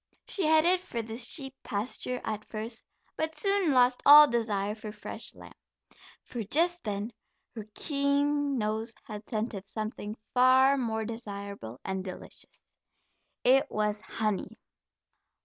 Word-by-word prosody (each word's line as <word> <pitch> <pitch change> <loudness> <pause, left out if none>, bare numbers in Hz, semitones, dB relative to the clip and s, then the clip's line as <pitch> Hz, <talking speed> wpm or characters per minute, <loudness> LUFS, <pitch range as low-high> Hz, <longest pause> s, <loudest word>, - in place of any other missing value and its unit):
She 375 -6 0
headed 320 +4 +5
for 235 -10 -5
the 220 0 -7
sheep 265 +3 -1
pasture 250 +3 -3
at 215 -1 -3
first, 225 +2 -6 0.3
but 315 0 -2
soon 395 0 +1
lost 250 -1 +4
all 295 +1 +10
desire 210 -5 0
for 215 -1 -7
fresh 210 - -8
lamb, - - -13 0.7
for 240 - -6
just 340 - +1
then 210 +1 -3 0.4
her 220 -3 -7
keen 285 -1 +1
nose 220 +1 -2
had 210 -1 -9
scented 215 -3 -3
something 215 0 -5 0.2
far 260 +2 +6
more 220 -4 -1
desirable 200 - -7
and 190 -1 -2
delicious. 185 -1 -9 0.8
It 270 +3 +4
was 210 0 -1
honey. 215 -4 -3
230 Hz, 130 wpm, -29 LUFS, 210-280 Hz, 0.8 s, all